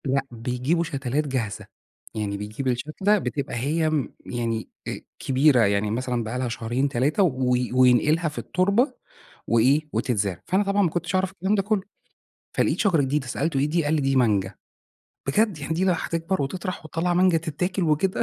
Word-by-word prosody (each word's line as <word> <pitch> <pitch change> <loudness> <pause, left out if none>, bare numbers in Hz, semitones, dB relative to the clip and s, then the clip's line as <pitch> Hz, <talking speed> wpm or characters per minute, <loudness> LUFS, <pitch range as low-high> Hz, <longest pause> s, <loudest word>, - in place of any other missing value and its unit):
لأ 135 0 +1
بيجيبوا 125 +8 -1
شتلات 140 -1 -2
جاهزة، 120 -7 -3 0.5
يعني 105 -2 -2
بيجيب 105 +6 -5
الشتلة 155 +12 +1
بتبقى 140 -9 -3
هي 155 +6 0 0.3
يعني 115 -2 -3 0.2
أ - - -4 0.2
كبيرة، 135 0 +3
يعني 100 +1 +1
مثلًا 125 +1 -1
بقي 110 +3 -4
لها 125 -1 -1
شهرين، 120 +4 -1
3 140 - +2
و 130 -7 +1 0.2
وينقلها 130 +6 +4
في 150 - -13
التربة 200 +9 +1 0.5
وإيه 130 +6 +4
وتتزرع. 105 -5 -1
فأنا 190 +3 +2
طبعًا 200 0 +1
ما 175 - +2
كنتش 175 +4 -2
أعرف 185 0 +1
الكلام 195 +2 0
ده 200 - +2
كله 205 -1 0 0.7
فلقيت - - +2
شجرة 180 -8 +3
جديدة 135 0 -1
سألته: 140 +2 -1
"إيه 140 - +2
دي 165 +1 +1
قال 145 - +1
لي 155 - +2
دي 135 0 +1
مانجا، 105 -6 +2 0.7
بجد 205 +3 +2
يعني 145 +2 -3
دي 180 +3 +1
لو 190 - +4
هتكبر 165 +3 -2
وهتطرح 180 +6 -3
وهتطلع 170 +3 -1
مانجا 180 -1 +4
تتاكل 180 +4 -2
وكده" 170 +4 +1
145 Hz, 170 wpm, -24 LUFS, 125-175 Hz, 0.7 s, وينقلها